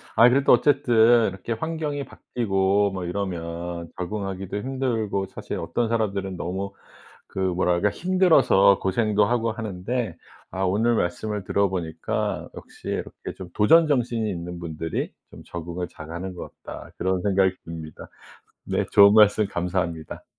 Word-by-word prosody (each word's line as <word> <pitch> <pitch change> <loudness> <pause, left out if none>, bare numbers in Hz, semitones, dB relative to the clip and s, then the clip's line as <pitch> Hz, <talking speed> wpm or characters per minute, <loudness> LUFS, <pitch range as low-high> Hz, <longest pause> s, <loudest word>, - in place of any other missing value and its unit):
아 120 +2 +7
그래도 135 +2 +3
어쨌든 120 -4 +5
이렇게 95 +5 -5
환경이 150 +2 -3
바뀌고 100 -3 0
뭐 95 -2 -4
이러면 85 -2 -4
적응하기도 95 +1 -4
힘들고 115 -5 -1
사실 - - -6
어떤 120 -2 -1
사람들은 100 -5 -1
너무 95 +3 -4 0.5
그 - - -15
뭐랄까 90 +1 +1
힘들어서 160 - +4
고생도 105 +1 +2
하고 115 0 0
하는데 110 +2 -4 0.3
아 95 - -3
오늘 110 +5 +2
말씀을 105 +3 -2
들어 100 +1 +1
보니까 80 -3 -3
역시 - - -12
이렇게 - - -5
좀 90 -2 -8
'도전 160 +11 +5
정신이 120 -5 0
있는 90 -1 -6
분들이 80 -1 -4 0.2
좀 - - -13
적응을 85 +1 -5
잘하는 85 +4 -7
것 90 - -8
같다.' - - -9
그런 95 -1 0
생각이 95 -1 +2
듭니다. 80 -2 -9 0.6
네 - - -1
좋은 100 0 +7
말씀 105 -1 +5
감사합니다. 85 -3 -3
100 Hz, 320 characters per minute, -24 LUFS, 90-115 Hz, 0.6 s, 아